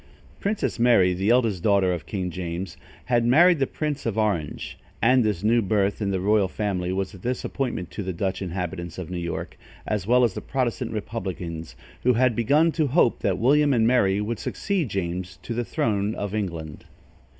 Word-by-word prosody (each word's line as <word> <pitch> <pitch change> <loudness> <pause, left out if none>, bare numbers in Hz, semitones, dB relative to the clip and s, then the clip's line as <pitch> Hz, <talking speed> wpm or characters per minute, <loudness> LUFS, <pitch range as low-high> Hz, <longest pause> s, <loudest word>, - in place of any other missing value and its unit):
Princess 200 - -1
Mary, 115 -7 +5
the 95 +4 -1
eldest 115 -7 +3
daughter 100 -3 +3
of 85 - -6
King 95 -3 -3
James, 90 +1 -5 0.3
had 120 -1 +2
married 165 +8 +5
the 135 - +2
Prince 150 -4 -3
of 110 -2 -2
Orange, 100 -9 -2 0.2
and 125 +2 +4
this 105 -4 -1
new 115 +2 +4
birth 100 0 0
in 100 - 0
the 95 -1 0
royal 100 +1 +3
family 90 -2 -2
was 95 +2 -2
a 95 - -11
disappointment 125 -3 -3
to - - -5
the 95 -1 -3
Dutch 95 +2 -2
inhabitants 90 -2 -4
of 90 -1 -6
New 90 - -3
York, 85 0 -5 0.3
as 105 -3 -2
well 125 +2 +5
as 115 -5 +2
the - - -5
Protestant 125 -2 -2
republicans, 90 - -5 0.3
who 125 - +3
had 125 0 +2
begun 145 +9 +3
to 155 -2 0
hope 135 -3 +3
that 95 -2 0
William 145 +5 +4
and 110 -2 +3
Mary 105 -5 +3
would 105 +2 -3
succeed 190 - -2
James 90 -1 -3
to 120 - -4
the 120 +1 -1
throne 105 -2 -1
of 100 -1 -4
England. 85 -8 -4
105 Hz, 190 wpm, -24 LUFS, 90-120 Hz, 0.3 s, Mary